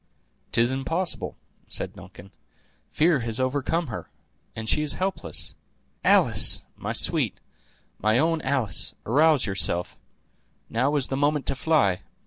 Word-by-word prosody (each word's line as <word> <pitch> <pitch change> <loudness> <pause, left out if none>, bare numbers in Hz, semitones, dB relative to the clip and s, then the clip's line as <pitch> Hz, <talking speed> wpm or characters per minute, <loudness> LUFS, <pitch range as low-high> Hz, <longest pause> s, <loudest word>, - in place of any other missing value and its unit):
"'Tis 120 +2 +3
impossible!" 165 +7 0 0.3
said - - -3
Duncan; 95 +3 -13 0.6
"fear 160 -2 +3
has 115 -1 -3
overcome 140 +6 0
her, 120 -7 -7 0.5
and 110 0 -6
she 150 - +1
is 150 -1 +3
helpless. 190 +1 -2 0.5
Alice! - - +3
my - - -5
sweet, - - +1 0.6
my 110 +2 +2
own 160 +3 +1
Alice, 130 - 0
arouse 150 +3 +3
yourself; 95 -3 -1 0.7
now 130 +6 +1
is 140 -3 +4
the 135 - -1
moment 145 0 +1
to - - +1
fly. 135 - +1
135 Hz, 125 wpm, -25 LUFS, 115-155 Hz, 0.7 s, is